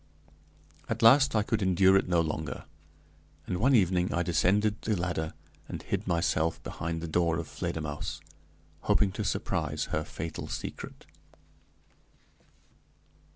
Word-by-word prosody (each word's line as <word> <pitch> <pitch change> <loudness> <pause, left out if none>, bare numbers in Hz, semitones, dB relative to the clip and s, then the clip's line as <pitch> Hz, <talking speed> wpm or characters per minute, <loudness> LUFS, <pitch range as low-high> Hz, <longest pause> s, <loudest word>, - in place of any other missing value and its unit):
At - - -2
last 135 +2 +7
I 105 - +3
could 110 0 -1
endure 95 0 +4
it 95 - +3
no 85 -2 +3
longer, 80 -1 -4 0.8
and 90 - -2
one 130 +4 +4
evening 90 -4 +2
I 85 - +1
descended 100 +5 +2
the 110 - 0
ladder 85 -3 -2 0.3
and - - -6
hid - - -3
myself 85 -1 +1
behind 80 0 -4
the 85 - -4
door 85 0 +1
of 85 -2 -4
Fledermausse, 75 -1 -4 0.6
hoping 100 -2 +2
to - - -4
surprise - - -2
her 80 - +1
fatal 80 +1 -6
secret. - - -7
90 Hz, 130 wpm, -29 LUFS, 80-100 Hz, 0.8 s, last